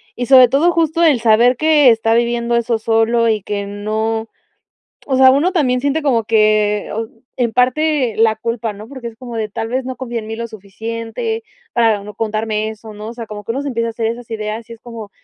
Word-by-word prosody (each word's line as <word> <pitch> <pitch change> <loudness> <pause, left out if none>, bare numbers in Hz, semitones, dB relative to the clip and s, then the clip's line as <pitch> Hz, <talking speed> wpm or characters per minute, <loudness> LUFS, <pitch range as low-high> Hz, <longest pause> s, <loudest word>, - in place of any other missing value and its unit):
y 245 0 -3
sobre 260 -2 +8
todo 295 +8 +3
justo 330 0 0
el 305 -7 +4
saber 235 +2 +4
que 305 -2 +5
está 225 -1 +2
viviendo 235 0 +1
eso 235 -1 +1
solo 225 +1 +2
y 215 -2 0
que 200 +1 -4
no 220 +2 -2 0.8
o 270 - +1
sea, 260 0 +7
uno 290 +7 +2
también 265 -9 +1
siente 285 +3 0
como 240 -6 +1
que 215 -1 +2
o 225 +1 -3 0.3
en 235 -3 0
parte 255 -1 +1
la 220 0 +3
culpa, 230 0 -3
¿no? 210 +2 -11
Porque 260 -4 -7
es 230 - -9
como 240 -1 -8
de: 215 -1 -2
"Tal 225 +2 -4
vez 255 +1 -2
no 260 - -5
confíe 240 -3 -4
en 215 - -9
mí 225 - -5
lo 230 0 -5
suficiente 230 - -5 0.3
para 225 -4 +2
no 210 +1 -9
contarme 215 0 -2
eso", 220 0 -10
¿no? 210 +1 -8
O 230 - -6
sea, 235 -1 -7
como 210 -1 -8
que - - -2
uno 270 +4 -3
se 285 - -3
empieza 230 -2 -1
a - - -3
hacer 225 0 -2
esas 235 +1 -5
ideas, 220 +1 -5
y 230 - -7
es 230 - -14
como, 230 -4 -9
230 Hz, 230 wpm, -17 LUFS, 220-255 Hz, 0.8 s, sobre